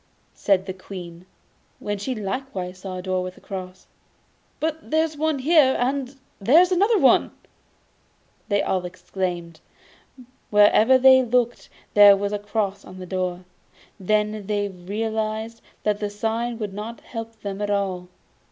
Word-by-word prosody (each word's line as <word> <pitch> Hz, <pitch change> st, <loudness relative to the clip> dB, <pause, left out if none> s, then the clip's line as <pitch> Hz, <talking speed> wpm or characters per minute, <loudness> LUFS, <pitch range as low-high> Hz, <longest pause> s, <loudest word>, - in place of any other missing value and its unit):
said 195 Hz, -2 st, +1 dB
the 190 Hz, -, -5 dB
Queen, 180 Hz, -2 st, -10 dB, 0.5 s
when 205 Hz, -, -3 dB
she 255 Hz, +6 st, -3 dB
likewise 195 Hz, -4 st, -5 dB
saw 185 Hz, -1 st, -6 dB
a 180 Hz, -, -6 dB
door 185 Hz, -1 st, -1 dB
with 185 Hz, 0 st, -6 dB
a -, -, -14 dB
cross. 185 Hz, -1 st, -8 dB, 0.7 s
'But 320 Hz, 0 st, -1 dB
here 315 Hz, +1 st, +3 dB
is 320 Hz, -1 st, -4 dB
one, 295 Hz, -3 st, -1 dB
and 270 Hz, -3 st, +2 dB, 0.2 s
there 245 Hz, -, +5 dB
is 365 Hz, +1 st, +4 dB
another!' 405 Hz, +4 st, +4 dB, 1.2 s
they 205 Hz, -1 st, +1 dB
all 185 Hz, -1 st, -1 dB
exclaimed; 175 Hz, -2 st, -5 dB, 0.9 s
wherever 210 Hz, +4 st, +5 dB
they 260 Hz, 0 st, +7 dB
looked 245 Hz, -1 st, 0 dB, 0.2 s
there 205 Hz, -1 st, +8 dB
was 200 Hz, +1 st, -2 dB
a 205 Hz, -, -1 dB
cross 205 Hz, -1 st, -2 dB
on 185 Hz, -, -12 dB
the 185 Hz, -, -7 dB
door. 180 Hz, -1 st, -3 dB, 0.5 s
Then 210 Hz, +1 st, 0 dB
they 205 Hz, -1 st, -1 dB
realised 220 Hz, +4 st, -4 dB, 0.2 s
that 210 Hz, -1 st, 0 dB
the 210 Hz, -, -2 dB
sign 225 Hz, +3 st, -2 dB
would 210 Hz, -3 st, -5 dB
not 215 Hz, +3 st, -7 dB
help 225 Hz, -1 st, -8 dB
them 200 Hz, 0 st, -5 dB
at 205 Hz, -, -2 dB
all. 190 Hz, -3 st, -2 dB
205 Hz, 145 wpm, -23 LUFS, 190-240 Hz, 1.2 s, there